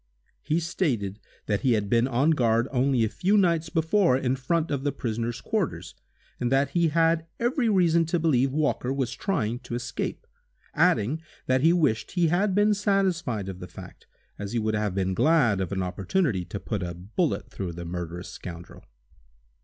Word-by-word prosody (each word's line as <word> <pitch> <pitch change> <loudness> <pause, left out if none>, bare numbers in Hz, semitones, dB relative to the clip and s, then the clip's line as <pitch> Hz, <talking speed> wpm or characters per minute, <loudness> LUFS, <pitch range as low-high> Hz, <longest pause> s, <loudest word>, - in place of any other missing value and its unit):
He 155 +3 0
stated 125 - -1 0.3
that 105 -2 0
he 130 -3 +3
had 105 -2 0
been 115 +4 +3
on 135 +5 +2
guard 115 -4 +2
only 130 -2 +2
a - - +2
few 190 - +1
nights 170 -4 +2
before 165 -2 +2
in 130 -1 0
front 155 +5 -1
of 140 -2 -1
the 145 - +1
prisoner's 115 -2 -3
quarters, - - -2 0.5
and 125 0 -1
that 135 +1 +2
he 170 +2 +2
had 165 +1 +2
every 240 0 +1
reason 170 -4 +3
to 175 - +1
believe 135 -5 +2
Walker 145 -3 0
was 135 -3 -1
trying 125 - -1
to 125 -2 -6
escape, 120 - -4 0.5
adding 130 +10 +2 0.2
that 130 0 +2
he 160 +3 +5
wished 145 -11 +1
he 175 -3 +2
had 185 +3 +1
been 210 +1 +4
satisfied 185 - 0
of 95 -1 -6
the 90 - -7
fact, - - -12 0.3
as 100 +1 -5
he - - 0
would 110 -1 0
have 105 -3 -1
been 95 -1 0
glad 120 - +3
of 95 - -3
an 95 -1 -1
opportunity 95 - -1
to 100 - -6
put 105 -1 -3
a 85 -1 -4
bullet 110 - -2
through 90 -3 -5
the 85 +1 -7
murderous 85 +1 -5
scoundrel. 85 -1 -9
130 Hz, 185 wpm, -26 LUFS, 105-165 Hz, 0.5 s, he